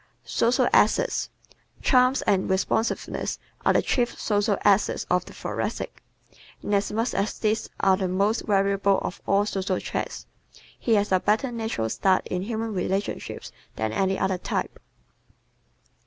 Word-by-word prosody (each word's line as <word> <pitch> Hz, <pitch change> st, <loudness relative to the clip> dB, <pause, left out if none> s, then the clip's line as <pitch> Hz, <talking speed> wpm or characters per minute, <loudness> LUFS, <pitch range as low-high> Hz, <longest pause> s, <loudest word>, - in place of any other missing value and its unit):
Social 235 Hz, +2 st, +2 dB
Assets -, -, +3 dB, 0.5 s
¶ -, -, -19 dB
Charm 255 Hz, 0 st, +4 dB
and 190 Hz, -2 st, +2 dB
responsiveness 195 Hz, +4 st, -1 dB, 0.3 s
are -, -, +4 dB
the -, -, +3 dB
chief 240 Hz, -2 st, 0 dB
social 205 Hz, -1 st, +1 dB
assets 205 Hz, 0 st, +3 dB
of 180 Hz, 0 st, +2 dB
the -, -, -12 dB
Thoracic. -, -, -4 dB, 0.6 s
Inasmuch 210 Hz, +3 st, 0 dB
as 200 Hz, +2 st, -1 dB
these 215 Hz, 0 st, 0 dB
are 190 Hz, -1 st, +5 dB
the 190 Hz, -1 st, -1 dB
most 200 Hz, +5 st, 0 dB
valuable 195 Hz, -1 st, +2 dB
of -, -, -5 dB
all 200 Hz, +1 st, +3 dB
social 190 Hz, -2 st, -1 dB
traits, -, -, -4 dB, 0.5 s
he 230 Hz, -, +2 dB
has 205 Hz, -1 st, +1 dB
a 185 Hz, -, +4 dB
better 220 Hz, +7 st, +1 dB
natural 225 Hz, -, -2 dB
start 185 Hz, -, +1 dB
in 180 Hz, -, -1 dB
human 225 Hz, +2 st, -3 dB
relationships 195 Hz, +2 st, -3 dB, 0.2 s
than 110 Hz, 0 st, -2 dB
any 190 Hz, +7 st, +1 dB
other 190 Hz, -1 st, 0 dB
type. -, -, -3 dB
200 Hz, 140 wpm, -25 LUFS, 190-220 Hz, 0.6 s, are